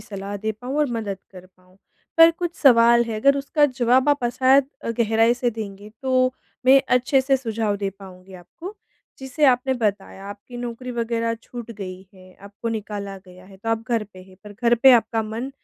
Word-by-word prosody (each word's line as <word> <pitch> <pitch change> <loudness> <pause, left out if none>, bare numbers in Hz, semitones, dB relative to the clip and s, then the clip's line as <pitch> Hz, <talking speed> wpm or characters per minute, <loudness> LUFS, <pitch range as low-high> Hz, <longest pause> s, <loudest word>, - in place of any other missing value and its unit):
सलाह 200 -1 -7
दे 215 +2 -3
पाऊँ 250 +6 -6
और 300 - +3
मदद 205 -4 -4
कर 185 -1 -13
पाऊँ, 185 +1 -26 0.4
पर 330 0 +8
कुछ 345 0 -5
सवाल 235 -3 +5
है 225 -2 -4
अगर 275 +2 +4
उसका 290 +2 +1
जवाब 255 0 +2
आप 285 -3 +1
अ, 240 - +2
शायद 260 +2 +3 0.3
गहराई 225 +1 +3
से 245 0 -1
देंगे, 205 -2 -8
तो 255 -1 +2 0.3
मैं 270 +1 +7
अच्छे 255 +2 +3
से 270 +1 +2
सुझाव 225 -4 -2
दे 200 -1 -3
पाऊँगी 190 -1 -14
आपको। 330 - -11 0.4
जैसे 265 +3 -2
आपने 260 0 +2
बताया 200 -2 -3
आपकी 205 +4 -10
नौकरी 245 +1 -6
वग़ैरह 230 -1 -2
छूट 240 -2 -9
गई 190 -3 -8
है, 185 0 -17
आपको 205 +3 -7
निकाला 205 -3 -5
गया 180 0 -15
है, 195 0 -15
तो 215 +4 -7
आप 225 0 0
घर 230 -2 +1
पे 185 - -14
हैं 185 0 -18
पर 210 - -10
घर 235 0 +4
पे 255 +2 +6
आपका 225 -1 +2
मन 225 +5 -5
230 Hz, 195 wpm, -22 LUFS, 200-255 Hz, 0.4 s, पर